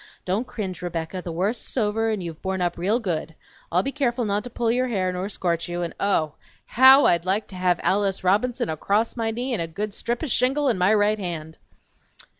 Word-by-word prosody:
Don't 200 +7 -1
cringe, 190 -6 -5
Rebecca; 175 +1 -4
the 175 - -6
worst's 200 +11 -3
over, 225 0 +1
and 210 -4 -2
you've 165 -2 -7
borne 190 0 -2
up 175 -1 0
real 200 +7 +1
good! 165 -7 -3 0.4
I'll 180 +3 +2
be 275 - -2
careful 255 -4 0
not 205 0 0
to - - -6
pull 235 -1 0
your 255 +2 +1
hair 185 -6 -1
nor 185 +2 -3
scorch 170 -3 -2
you, 175 0 -2
and 170 - -4
oh, 160 -7 +1 0.3
HOW 265 +3 +7
I'd 170 -1 +3
like 195 +4 0
to 190 - -9
have 180 -1 +1
Alice 195 -1 +1
Robinson 210 +7 +1
acrost 200 +8 0
my 225 -2 -1
knee 245 +3 -3
and 215 - -1
a 165 - -2
good 200 +6 -4
strip 240 +6 -3
o' - - 0
shingle 270 +2 +2
in 220 -7 0
my 180 +3 +4
right 210 0 +3
hand! 160 -4 -5
200 Hz, 220 wpm, -24 LUFS, 175-230 Hz, 0.4 s, HOW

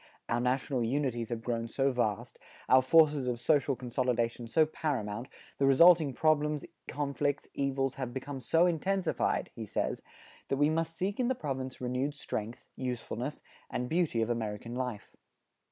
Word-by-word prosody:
"Our 120 +1 0
national 125 0 0
unities 120 -2 -1
have 115 -2 -4
grown 115 -1 -2
so 135 +4 +1
vast, 120 -1 -2 0.3
our 130 0 +7
forces 150 -1 +4
of 120 -1 -1
social 140 +1 +2
consolidation 120 -1 -1
so 155 +7 +4
paramount, 125 -7 -3 0.3
the 135 - +4
resulting 160 +2 +7
problems, 150 +1 +1 0.2
conflicts, 145 0 -1
evils, 135 -1 0
have 125 -2 -3
become 135 +2 -5
so 165 +8 +3
intensified," 185 +1 0
he - - -6
says, - - -2 0.5
that 135 - 0
we 145 +2 +3
must 165 +1 -1
seek 200 +4 -2
in 250 - +2
the 260 - +1
province 130 - -4
renewed 130 +3 -2
strength, 115 -4 -5
usefulness 125 +1 -4 0.3
and 125 0 -3
beauty 160 -9 +1
of 115 - -1
American 115 0 -3
life. 125 -4 -4
130 Hz, 155 wpm, -31 LUFS, 120-150 Hz, 0.5 s, our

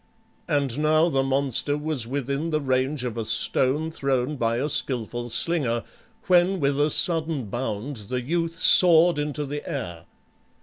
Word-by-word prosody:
And 145 -5 -1
now 155 +2 +3
the 135 -4 +1
monster 135 +1 0
was 150 -6 -3
within 140 +4 -3
the 155 -1 0
range 130 0 -1
of 120 -2 -4
a - - -2
stone 145 +8 0
thrown 135 -2 -2
by 115 -3 -1
a 135 +4 -1
skilful 120 -4 -3
slinger, 120 -4 -1 0.4
when 180 +1 +3
with 140 -1 0
a 150 - +2
sudden 160 -5 +2
bound 120 +2 -4
the 125 0 -2
youth 165 +4 -2
soared 170 -2 +6
into 150 0 -3
the 145 +1 -6
air. 85 -10 -6
140 Hz, 155 wpm, -24 LUFS, 125-155 Hz, 0.4 s, soared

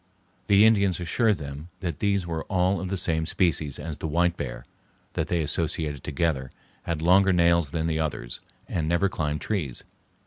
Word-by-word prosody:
The 100 +1 +6
Indians 100 -6 +3
assured 105 +4 +2
them 70 +3 -8
that 85 -6 -3
these 100 -3 +1
were 80 -2 -3
all 95 0 +1
of 95 - -4
the 95 - -1
same 80 -2 +1
species 80 -6 0
as 80 -2 -6
the - - -3
white 85 +2 +2
bear, - - -6 0.5
that - - -1
they 85 -2 0
associated 75 -1 -2
together, 75 -7 -1 0.4
had 80 -2 -2
longer 95 +3 +5
nails 85 -3 +3
than 80 +1 -2
the 80 -1 0
others, 75 -6 -3 0.3
and 80 -3 -2
never 85 +4 +2
climbed 75 -4 -2
trees. 75 - -2
85 Hz, 175 wpm, -26 LUFS, 75-90 Hz, 0.5 s, The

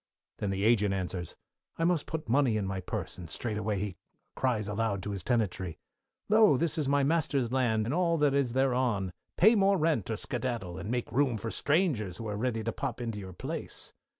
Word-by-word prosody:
Then 105 - -1
the 95 0 -1
Agent 105 -3 +3
answers, 90 -2 -4 0.4
I 165 - 0
must 170 -3 +2
put 160 0 -4
money 125 -2 +3
in 105 - -1
my 95 0 -2
purse, 95 - -5
and 85 -3 -8
straightway 105 +2 -2
he 95 -2 -3 0.4
cries 115 -6 0
aloud 105 -2 -1
to 105 - -3
his 100 -2 -4
tenantry, 95 -8 -1 0.5
Lo, 215 -8 +6
this 165 +3 0
is 145 -3 0
my 140 0 +3
master's 140 -5 +1
land 115 -5 +2
and 120 - -1
all 170 -1 +2
that 145 -2 +3
is 140 -4 +1
thereon, 125 -8 +1 0.2
pay 215 +6 +7
more 200 -2 +4
rent 155 - +1
or 110 - -1
skedaddle, 120 -9 -3
and 95 - -6
make 120 0 -2
room 130 -3 +2
for 115 +2 -4
strangers 140 - +1
who 115 - -5
are 105 - -3
ready 115 0 -1
to 115 - -1
pop 130 0 -4
into 115 -3 -3
your 95 -2 -8
place. - - -6
115 Hz, 205 wpm, -30 LUFS, 100-140 Hz, 0.5 s, pay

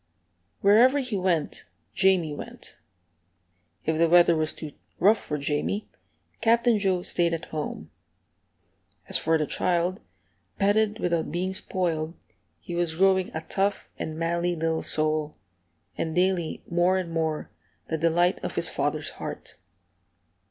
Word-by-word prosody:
Wherever 235 +7 +6
he 255 -6 -2
went, 180 -5 -1 0.3
Jamie 185 -5 +2
went. - - -8 1.1
If 160 0 0
the 165 0 +4
weather 175 0 +6
was 155 0 0
too 155 -2 -7 0.3
rough 210 +4 +5
for 150 - -4
Jamie, 150 +8 -2 0.5
Captain 230 0 +3
Joe 190 -3 +1
stayed 170 -2 +2
at 165 - -7
home. 145 - -5 1.2
As - - 0
for 160 0 +2
the 155 - 0
child, 175 +3 0 0.6
petted 210 +1 +2
without 170 -2 -1
being 185 +3 -2
spoiled, 170 -4 -2 0.5
he 175 - -7
was 170 -2 0
growing 190 +1 +3
a 160 - -2
tough 195 +4 -1
and 155 0 -4
manly 170 +1 0
little 160 0 -1
soul, 155 -1 0 0.6
and 160 - -3
daily 180 -2 0
more 175 +2 +2
and 180 -3 -3
more 160 -2 -2 0.4
the 160 - -1
delight 175 +2 +2
of - - -4
his - - +3
father's - - -2
heart. - - -8
175 Hz, 135 wpm, -26 LUFS, 160-190 Hz, 1.2 s, Wherever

